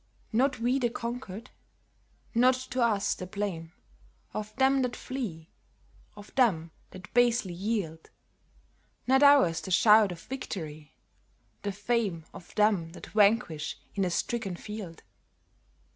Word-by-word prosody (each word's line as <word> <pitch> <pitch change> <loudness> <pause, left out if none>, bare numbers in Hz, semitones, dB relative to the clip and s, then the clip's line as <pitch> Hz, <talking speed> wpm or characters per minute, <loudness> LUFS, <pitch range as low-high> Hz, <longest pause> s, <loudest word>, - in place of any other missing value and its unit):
Not 260 +2 +2
we 245 +3 +1
the 240 -2 +1
conquered! 235 -3 -6 0.8
Not 250 +2 +5 0.2
to 255 - 0
us 210 -3 +2
the 185 - -7
blame 185 -5 -4 0.6
Of 215 0 -5
them 270 0 +3
that 250 -1 -1
flee, 195 -12 -6 0.6
of 205 0 -13
them 175 -11 +2 0.2
that 185 -1 -12
basely 240 -6 +3
yield; 180 -4 -3 1.0
Nor 265 +2 +4
ours 270 - +6
the - - -7
shout 210 +2 +6
of 170 -1 -8
victory, 155 - -7 0.7
the 205 - -2
fame 205 -5 -1
Of 170 - -13
them 205 -6 +2
that - - -10
vanquish 205 -7 +2 0.2
in 195 - 0
a 185 - +1
stricken 195 +2 -2
field. 205 -4 -8
210 Hz, 130 wpm, -29 LUFS, 175-240 Hz, 1.0 s, ours